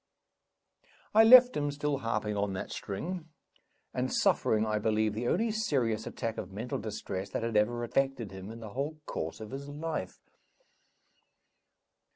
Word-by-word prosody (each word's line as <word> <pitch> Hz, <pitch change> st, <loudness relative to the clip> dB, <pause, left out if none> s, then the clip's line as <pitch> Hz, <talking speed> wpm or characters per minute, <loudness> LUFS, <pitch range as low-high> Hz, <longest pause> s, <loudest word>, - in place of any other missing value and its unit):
I 220 Hz, +1 st, +8 dB
left 250 Hz, +2 st, +9 dB
him 145 Hz, 0 st, 0 dB
still 145 Hz, -1 st, -1 dB
harping 110 Hz, -3 st, -1 dB
on 100 Hz, -1 st, -1 dB
that 95 Hz, -, -5 dB
string, 165 Hz, -, -5 dB, 0.6 s
and -, -, -1 dB
suffering, 110 Hz, 0 st, +2 dB
I 105 Hz, -1 st, 0 dB
believe, 110 Hz, 0 st, +1 dB
the 115 Hz, +3 st, -2 dB
only 220 Hz, -, +2 dB
serious 130 Hz, -, 0 dB
attack 115 Hz, -1 st, -3 dB
of 95 Hz, -, -6 dB
mental 110 Hz, +6 st, -4 dB
distress 100 Hz, -2 st, -4 dB
that 105 Hz, -, -3 dB
had 115 Hz, -1 st, -2 dB
ever 120 Hz, +3 st, +2 dB
affected 130 Hz, -3 st, 0 dB
him 95 Hz, +1 st, -8 dB
in 115 Hz, +1 st, -9 dB
the 110 Hz, -, -7 dB
whole 145 Hz, +6 st, -3 dB
course 80 Hz, -, -4 dB
of 110 Hz, +1 st, -8 dB
his 140 Hz, +1 st, -6 dB
life. 150 Hz, -, -4 dB
115 Hz, 155 wpm, -30 LUFS, 105-145 Hz, 0.6 s, left